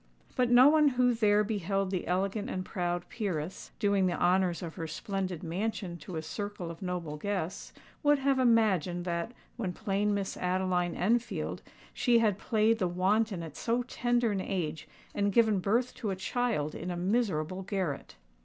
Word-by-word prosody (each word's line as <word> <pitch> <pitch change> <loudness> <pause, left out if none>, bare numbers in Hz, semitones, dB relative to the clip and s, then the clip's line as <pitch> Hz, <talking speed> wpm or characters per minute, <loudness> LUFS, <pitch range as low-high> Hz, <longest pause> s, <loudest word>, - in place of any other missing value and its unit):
But 250 -1 +2
no 245 +2 +8
one 305 0 +5
who 250 -2 +3
there 210 -2 +3
beheld 195 -2 -1
the 185 - -2
elegant 195 +5 -1
and 185 -6 -3
proud 175 -1 -2
peeress, 185 -6 -4
doing 200 -3 +2
the 175 - -1
honours 180 0 +2
of 165 -2 -5
her 165 - -5
splendid 185 +1 -3
mansion 185 +1 -3
to 170 +2 -8
a 160 - -3
circle 185 +1 -5
of 165 - -11
noble 175 -5 -3
guests, 190 0 -3 0.3
would 290 -1 +4
have 275 -1 +1
imagined 195 - +2
that, 170 +3 -2 0.3
when 195 -7 -2
plain 205 +2 0
Miss 195 -1 -3
Adeline 180 -1 0
Enfield, 235 +6 0 0.3
she 240 -2 +3
had 215 -4 +2
played 225 -1 +2
the 185 - +2
wanton 190 +1 +1
at 160 -3 -8
so 240 +1 0
tender 240 -2 0
an 195 -2 -1
age, 160 -6 -3 0.3
and 200 0 +1
given 220 -2 +4
birth 235 +7 +1
to 215 - -4
a 190 - -1
child 190 -6 -1
in 180 - -5
a 175 - -3
miserable 185 -3 0
garret! 185 -7 -3
195 Hz, 170 wpm, -30 LUFS, 175-225 Hz, 0.3 s, no